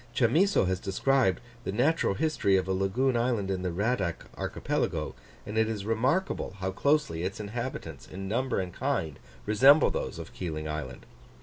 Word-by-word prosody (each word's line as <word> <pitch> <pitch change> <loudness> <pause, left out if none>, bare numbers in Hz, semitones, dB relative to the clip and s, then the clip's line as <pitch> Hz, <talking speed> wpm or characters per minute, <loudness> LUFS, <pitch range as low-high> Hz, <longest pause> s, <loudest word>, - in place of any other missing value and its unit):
Chamisso 160 - +3
has 95 0 0
described 110 +2 +1 0.2
the - - -2
natural 125 0 +2
history 100 -7 +2
of 95 0 -1
a - - 0
lagoon 110 +8 +1
island 115 -5 0
in 95 -1 -2
the 90 - -1
Radack 100 -1 -1
Archipelago; - - -2 0.3
and 105 +2 -1
it 110 0 +2
is 105 -3 -4
remarkable 125 - 0
how 95 0 -2
closely 140 - +1
its 95 +4 -3
inhabitants, 105 - -5
in 95 +1 -6
number 125 +4 0
and 90 -2 -4
kind, 75 -3 -2 0.3
resemble 135 +8 +6
those - - -3
of - - -8
Keeling 80 -4 -4
Island. 75 -5 -5
100 Hz, 165 wpm, -29 LUFS, 95-130 Hz, 0.3 s, resemble